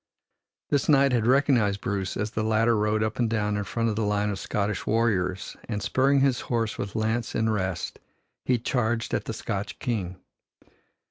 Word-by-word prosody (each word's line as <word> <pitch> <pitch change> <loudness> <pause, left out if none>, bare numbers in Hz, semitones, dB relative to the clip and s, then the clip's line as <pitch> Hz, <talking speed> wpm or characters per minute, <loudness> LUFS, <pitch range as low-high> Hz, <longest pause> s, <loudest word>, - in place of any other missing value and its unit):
This 145 -1 +1
knight 140 -2 +5
had 120 -2 +1
recognized 125 -7 +3
Bruce 95 -2 -2
as 105 +1 -2
the 110 - -2
latter 110 +1 +3
rode 105 0 +1
up 110 +2 -3
and 120 -2 +2
down 105 -2 0
in 105 - -1
front 115 +3 -1
of 110 - 0
the 115 - -1
line 105 0 +1
of 100 - -4
Scottish 105 -1 -2
warriors 100 -5 0
and 105 -3 -1
spurring 135 +7 +2
his 135 -2 +2
horse 115 -3 0
with 100 +1 -4
lance 110 +1 -1
in 110 0 +1
rest 95 -4 -2 0.4
he 125 - +2
charged 120 -1 -1
at - - -1
the - - -4
Scotch - - -4
King. 95 -6 -3
110 Hz, 185 wpm, -26 LUFS, 105-120 Hz, 0.4 s, knight